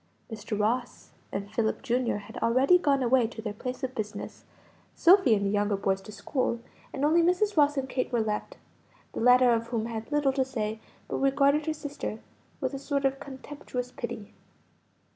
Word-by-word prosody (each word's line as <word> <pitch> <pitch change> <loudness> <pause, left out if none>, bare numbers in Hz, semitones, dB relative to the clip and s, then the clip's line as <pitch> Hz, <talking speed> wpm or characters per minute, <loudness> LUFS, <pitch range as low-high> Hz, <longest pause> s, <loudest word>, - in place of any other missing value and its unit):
Mr. 215 -1 -4
Ross 240 +4 -1 0.2
and 200 +1 -5
Philip, 220 +2 0
Jr., 250 -1 0
had - - -10
already 265 +10 +4
gone 280 -5 +2
away 245 -1 +3
to 225 - -11
their 215 -2 -4
place 250 +5 -6
of 260 0 -2
business, 210 -3 -6 0.5
Sophie 350 - +6
and 200 -1 -1
the 195 - +1
younger 205 0 +1
boys 195 0 0
to 215 - -11
school, 235 +2 -2 0.3
and 275 +1 -1
only 325 +3 +4
Mrs. 365 +5 +2
Ross 290 -2 +4
and 265 -1 -1
Kate 260 0 -2
were 240 - +1
left, 215 -1 -2 0.6
the - - -4
latter 250 +1 +6
of 230 0 -1
whom 230 -2 -2
had 225 +2 -6
little 295 -2 +2
to 265 -1 +2
say, 220 -4 -3 0.3
but - - -3
regarded 280 +2 +2
her 315 - +1
sister 290 -7 -5 0.4
with - - -2
a 275 - -4
sort 280 0 -1
of 270 0 +1
contemptuous 265 -2 -7
pity. 235 -4 -7
250 Hz, 185 wpm, -28 LUFS, 220-280 Hz, 0.6 s, Sophie